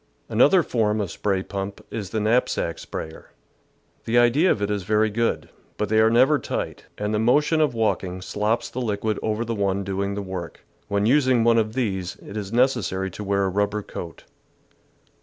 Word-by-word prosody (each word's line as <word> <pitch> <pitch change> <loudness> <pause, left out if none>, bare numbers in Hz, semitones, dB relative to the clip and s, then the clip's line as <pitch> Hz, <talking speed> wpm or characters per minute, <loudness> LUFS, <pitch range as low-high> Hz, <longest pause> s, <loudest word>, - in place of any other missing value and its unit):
Another 145 - +5
form 110 -5 0
of 100 -5 -2
spray 95 +1 -1
pump 100 0 -5
is 105 -4 -4
the 110 - -2
knapsack 110 -6 0
sprayer. 80 0 -7 0.8
The 115 +2 +1
idea 120 +9 +4
of - - +2
it 100 0 -1
is 105 -1 -1
very 105 +3 +1
good, 115 +2 -1 0.3
but 105 - -1
they 110 0 +3
are 110 0 +5
never 130 +6 +4
tight, - - -4
and 105 +1 -2
the 105 - +1
motion 150 +7 +3
of 145 -6 +1
walking 95 -5 -1
slops 105 +5 -1
the 130 - -4
liquid 110 -1 -1
over 110 +2 -1
the 115 - -2
one 100 -2 0
doing 100 +1 -2
the 100 - -3
work. 95 -3 -7 0.2
When 100 0 0
using 130 -1 +4
one 115 0 +4
of 110 -1 -1
these, 95 -8 -2
it 100 - -12
is 105 -2 -4
necessary 115 -7 +1
to 105 - -7
wear 100 0 +1
a 95 - +1
rubber 105 +2 -1
coat. 85 -3 -8
105 Hz, 190 wpm, -24 LUFS, 100-115 Hz, 0.8 s, Another